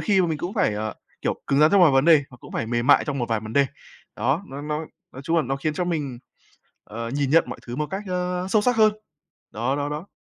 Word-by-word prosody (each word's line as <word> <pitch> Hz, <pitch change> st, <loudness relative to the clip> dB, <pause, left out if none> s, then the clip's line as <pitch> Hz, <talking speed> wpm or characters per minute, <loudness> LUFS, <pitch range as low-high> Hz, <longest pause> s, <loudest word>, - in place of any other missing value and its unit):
khi 195 Hz, -3 st, +3 dB
mà 175 Hz, -, +2 dB
mình 155 Hz, -3 st, -2 dB
cũng 180 Hz, +8 st, -4 dB
phải, 110 Hz, -, +1 dB
ờ, 110 Hz, 0 st, -3 dB, 0.3 s
kiểu, -, -, -1 dB
cứng 140 Hz, -, +2 dB
rắn 155 Hz, +1 st, +6 dB
trong 195 Hz, -3 st, +5 dB
vài 160 Hz, -, +7 dB
vấn 135 Hz, +1 st, +3 dB
đề 160 Hz, -4 st, +6 dB
và 125 Hz, -, -13 dB
cũng -, -, -12 dB
phải 115 Hz, -, -2 dB
mềm 120 Hz, +1 st, -1 dB
mại -, -, +6 dB
trong 140 Hz, -2 st, -3 dB
một 120 Hz, -, -2 dB
vài 110 Hz, -2 st, 0 dB
vấn 110 Hz, 0 st, -8 dB
đề. 140 Hz, +1 st, +4 dB, 0.5 s
Đó, 150 Hz, +8 st, 0 dB
nó 140 Hz, +1 st, -7 dB
nó 150 Hz, +1 st, -3 dB, 0.3 s
nói 135 Hz, -, -9 dB
chung 165 Hz, +2 st, +1 dB
là 160 Hz, -, +3 dB
nó 135 Hz, +2 st, -2 dB
khiến 150 Hz, +2 st, -2 dB
cho 180 Hz, -, -1 dB
mình, 145 Hz, -8 st, -3 dB, 0.7 s
ờ, 115 Hz, +2 st, -6 dB
nhìn 140 Hz, 0 st, -1 dB
nhận 165 Hz, +2 st, +5 dB
mọi 125 Hz, -, -7 dB
thứ 120 Hz, +1 st, -5 dB
một 150 Hz, 0 st, -1 dB
cách, 195 Hz, +2 st, -3 dB
ơ, 180 Hz, 0 st, -2 dB
sâu 210 Hz, 0 st, +3 dB
sắc 245 Hz, 0 st, +2 dB
hơn. 215 Hz, -1 st, +5 dB, 0.6 s
Đó, 120 Hz, +6 st, -1 dB
đó, 145 Hz, 0 st, -2 dB
đó. 150 Hz, +6 st, -6 dB
145 Hz, 275 wpm, -24 LUFS, 130-175 Hz, 0.7 s, vài